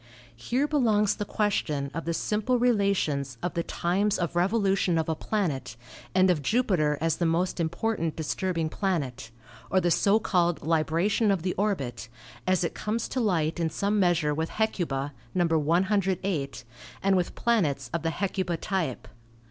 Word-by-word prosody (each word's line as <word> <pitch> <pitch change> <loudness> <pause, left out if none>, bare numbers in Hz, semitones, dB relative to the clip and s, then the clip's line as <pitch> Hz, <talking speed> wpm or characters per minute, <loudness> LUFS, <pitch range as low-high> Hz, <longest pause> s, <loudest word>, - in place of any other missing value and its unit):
Here 245 - 0
belongs 220 -9 +2
the 205 - -3
question 155 -11 -1
of 165 - -4
the 170 - -1
simple 215 +7 0
relations 200 - +1
of 175 - -1
the 170 - 0
times 190 +5 0
of 170 -1 -2
revolution 195 -1 +2
of 160 - 0
a 160 - +1
planet 145 - -2 0.4
and 185 0 +5
of 160 -5 0
Jupiter 160 - +1
as 165 0 0
the 170 - +1
most 175 +3 0
important 170 0 -1
disturbing 165 +1 -1
planet, 145 - -2 0.4
or 190 - +3
the 175 -1 +1
so 205 +5 +4
called 175 -5 +1
li 160 0 +3
bration 200 +7 +1
of 190 -4 0
the 185 - 0
orbit, 135 - -2 0.4
as 185 -1 +2
it 170 - -1
comes 220 +2 -2
to 260 - -2
light 175 -7 +1
in 165 -1 +1
some 200 +6 0
measure 170 -5 +2
with 160 +2 -2
Hecuba 150 -10 -1 0.2
(No. 175 -1 +3
108) 170 -3 0 0.4
and 195 0 +4
with 180 -2 -1
planets 150 - 0
of 170 - -1
the 165 - 0
Hecuba 185 -1 -2
type. 160 - -2
175 Hz, 165 wpm, -27 LUFS, 160-200 Hz, 0.4 s, and